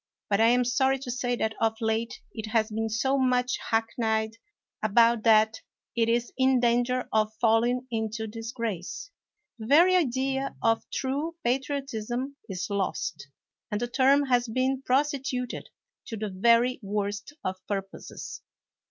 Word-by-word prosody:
But 200 +2 +3
I 225 - +6
am 245 +1 +4
sorry 265 +2 +2
to 255 -2 -6
say 245 0 -1
that 220 -2 -1
of 225 -1 +1
late 225 +1 -1
it 220 -1 -5
has 220 0 +1
been 225 +1 -1
so 265 +5 +1
much 255 -1 +1
hackneyed 225 -1 0 0.5
about 230 +2 +4
that 220 0 +4 0.3
it 230 -1 +2
is 235 +1 0
in 260 -1 +4
danger 245 +1 +1
of 215 0 +1
fall 225 0 +4
ing 250 +1 0
into 220 0 -2
disgrace. 225 - -5 0.5
The 220 - -7
very 340 +7 +6
idea 270 -3 0
of 225 0 +1
true 285 +5 -2
patriot 275 +2 -1
ism 240 +5 -3
is 185 -2 -3
lost, 185 -6 -2 0.4
and 210 -2 -2
the 240 - -1
term 270 +3 +4
has 245 -2 +2
been 260 +3 0
prostituted 265 -2 -1 0.4
to 225 - -5
the 210 0 -3
very 235 +6 +3
worst 205 +3 -3
of 185 0 -2
purposes. 195 -1 -6
235 Hz, 150 wpm, -27 LUFS, 220-260 Hz, 0.5 s, I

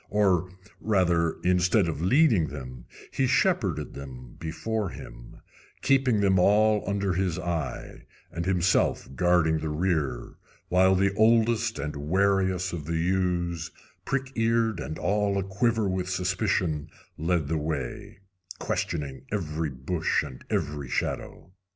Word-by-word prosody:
Or, 95 -4 +2 0.3
rather, 85 -6 +1
instead 90 +2 +3
of 80 -2 -3
leading 110 - +4
them, 65 -4 -8 0.3
he 135 - +1
shepherded 110 - +1
them 65 -3 -10
before 100 +6 -3
him, - - -11 0.4
keeping 130 -5 +3
them 95 -2 +3
all 105 +3 +4
under 100 -2 0
his 90 -2 -1
eye, 85 -6 -4 0.2
and 85 +2 -4
himself 95 -1 +2
guarding 80 -1 +2
the 80 - -3
rear, 75 -6 -1 0.3
while 95 +1 +4
the 95 +1 +2
oldest 115 +1 +3
and 75 0 -4
wariest 95 -1 +1
of 80 -4 -5
the 85 0 -1
ewes, 85 -1 0 0.3
prick 135 -1 -2
eared 115 -3 +1
and 80 - -5
all 100 +3 0
a 100 - 0
quiver 110 +3 0
with 95 -1 -2
suspicion, 90 -4 0 0.3
led 80 -1 0
the 80 +1 -1
way, 75 +3 -5 0.4
questioning 70 -5 -3
every 80 -6 -2
bush 70 +6 -1
and 65 - -9
every 75 -3 -2
shadow. 90 - -3
90 Hz, 130 wpm, -27 LUFS, 80-100 Hz, 0.4 s, leading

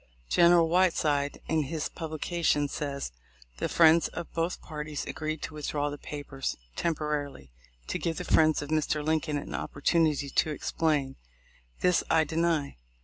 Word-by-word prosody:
General 170 -1 +6
Whiteside, 160 -5 +2
in 155 -2 +1
his 155 +1 -2
publication, 160 -2 -1
says: 140 - -4 0.5
"The - - -2
friends 165 0 +5
of 170 - -7
both 165 +2 -1
parties 150 -1 -5
agreed 155 0 -4
to - - -5
withdraw 145 -1 -2
the 145 - -7
papers 145 -2 -5 0.2
(temporarily) 150 - -2 0.3
to - - -3
give 165 -1 -2
the 180 - -3
friends 155 -3 +3
of 145 - -8
Mr. 155 -1 0
Lincoln 155 -1 0
an 145 - -6
opportunity 150 -1 +1
to 155 - +2
explain." 150 -3 -1 0.6
This 180 -1 +3
I 160 - +4
deny. 160 - 0
155 Hz, 145 wpm, -29 LUFS, 145-165 Hz, 0.6 s, General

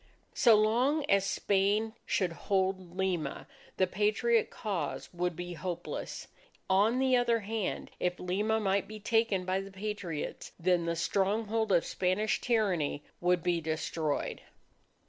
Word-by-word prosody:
So 240 -7 +6
long 245 +8 +2
as 195 -1 +3
Spain 205 +3 +1
should 185 -3 +1
hold 185 0 -1
Lima, 180 -7 -1 0.3
the 185 - +4
Patriot 215 +4 +2
cause 200 -5 -4
would 175 0 -1
be 175 +1 -5
hopeless. 175 0 -5 0.4
On 205 +6 +3
the 260 -1 +3
other 240 -2 +2
hand, 215 0 -3
if 180 0 -1
Lima 210 +5 0
might 195 -1 +1
be 215 +1 -8
taken 220 -3 +1
by 185 +1 0
the 195 - -8
Patriots, 195 -5 -5
then 175 0 +2
the 170 0 0
stronghold 205 +5 0
of 175 -3 +4
Spanish 190 +5 0
tyranny 190 -11 +1 0.2
would 180 -1 +2
be 175 -2 +1
destroyed. 155 -1 -2
195 Hz, 135 wpm, -31 LUFS, 180-215 Hz, 0.4 s, So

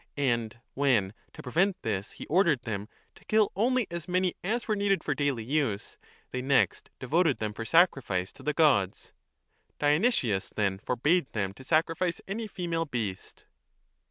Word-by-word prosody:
And 120 -5 0
when, 120 -9 +2 0.2
to - - -10
prevent 175 +9 +1
this, 100 -3 -2
he - - -9
ordered 165 -6 +2
them 105 -2 -4 0.2
to - - -20
kill 215 -1 +3
only 245 +3 +2
as 170 0 -5
many 180 0 +1
as 230 +6 -1
were 215 - +1
needed 200 -1 +1
for - - 0
daily 140 -6 -1
use, 125 -5 -1 0.3
they 130 - -3
next 135 0 +1
devoted 155 +3 +1
them 105 -1 -3
for 115 - -6
sacrifice 125 - +2
to - - -15
the 150 - 0
gods. 140 - +2 0.6
Dionysius 145 - +2
then 100 -2 0
forbade 140 - +1
them 100 -3 -2
to 115 - -13
sacrifice 165 +4 +1
any 215 +3 -3
female 170 -4 -2
beast. 110 -10 -5
145 Hz, 155 wpm, -28 LUFS, 110-180 Hz, 0.6 s, kill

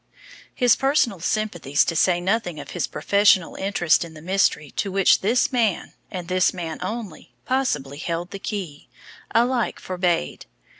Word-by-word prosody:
His 245 -2 +4
personal 270 - +1
sympathies, 175 -7 0
to 165 - -2
say 175 +2 +3
nothing 180 -3 -1
of - - -9
his 175 - -2
professional 200 -3 +3
interest 190 -5 +1
in 165 -1 -11
the 155 - -11
mystery 180 -5 +1
to 200 - -3
which 195 0 +4
this 235 +8 +2
man 230 -7 0 0.2
and 180 -2 -6
this 185 0 +2
man 165 -3 -5
only 215 -7 -6
possibly 150 - -1
held 170 +3 -4
the 195 - -6
key, 185 -9 -6 0.5
alike 240 0 +1
forbade. 180 - -2
185 Hz, 150 wpm, -23 LUFS, 170-215 Hz, 0.5 s, His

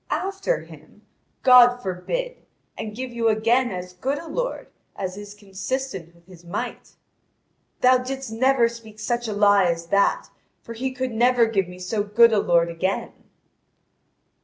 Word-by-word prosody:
"After 390 +5 -1
him? - - -16 0.4
God 245 -1 +7
forbid, 245 - -4 0.4
and 210 -1 -6
give 255 +1 -5
you 235 -1 -1
again 230 +3 +2
as 180 -1 -7
good 265 +10 -2
a 335 - -8
lord, - - -3 0.3
as 185 -2 -4
is 205 0 -10
consistent 195 -2 -5
with 170 0 -24
His 180 -2 -16
might." 175 +3 -6 0.9
"Thou 255 0 +5
didst 265 -1 -5
never 250 +1 +3
speak 230 -2 -11
such 240 +2 -2
a 215 - -3
lie 205 -1 +4
as 170 -1 -1
that, 200 0 +1 0.3
for 230 - -8
He 260 +3 -3
could 260 0 -3
never 240 +1 +3
give 200 -5 0
me 180 0 -11
so 185 +4 -2
good 220 +3 +4
a 210 - +3
lord 170 -3 +2
again." 185 +3 -2
225 Hz, 160 wpm, -23 LUFS, 190-255 Hz, 0.9 s, God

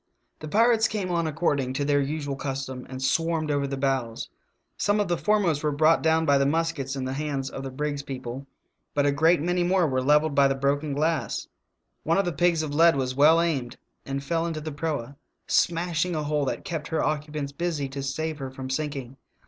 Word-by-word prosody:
The 155 - -7
pirates 225 +5 +4
came 200 -4 -3
on 170 -2 0
according 145 -5 0
to 140 +2 -1
their 145 0 +3
usual 145 0 -3
custom 130 -1 -5
and 130 0 -6
swarmed 165 +1 +1
over 140 -1 0
the 135 0 -4
bows. 130 -4 -2 0.4
Some 205 +1 +1
of 205 - +1
the 175 - +2
foremost 185 -6 +1
were 150 - 0
brought 155 +3 +4
down 160 0 +2
by 140 -2 +4
the 140 - +3
muskets 150 -3 -1
in 130 -1 -3
the 130 - -3
hands 140 -2 -3
of - - -6
the 135 - -5
brig's 145 +2 -3
people, 130 -1 -7 0.5
but 145 -1 +2
a 145 - +4
great 160 +3 +3
many 175 +1 +1
more 180 0 +3
were 130 -4 0
levelled 150 +3 +3
by 140 0 +5
the 135 - 0
broken 140 +2 0
glass. 155 +3 -1 0.6
One 165 +2 +1
of 195 - +2
the 175 - -1
pigs 170 +1 +2
of 145 -2 -4
lead 165 +1 +5
was 130 -2 -1
well 150 +5 +6
aimed 140 -7 -1 0.3
and 135 0 -4
fell 165 +3 -1
into 160 -2 -3
the 155 +1 -5
proa, 145 -3 -4 0.3
smashing 170 0 +1
a 155 - -1
hole 150 -1 0
that 135 - -3
kept 165 -6 -4
her 160 - -1
occupants 150 -1 -2
busy 155 -2 -2
to 140 +1 -5
save 155 +3 -3
her 135 -1 -4
from 130 0 -7
sinking. 135 -3 -4
150 Hz, 215 wpm, -26 LUFS, 135-165 Hz, 0.6 s, well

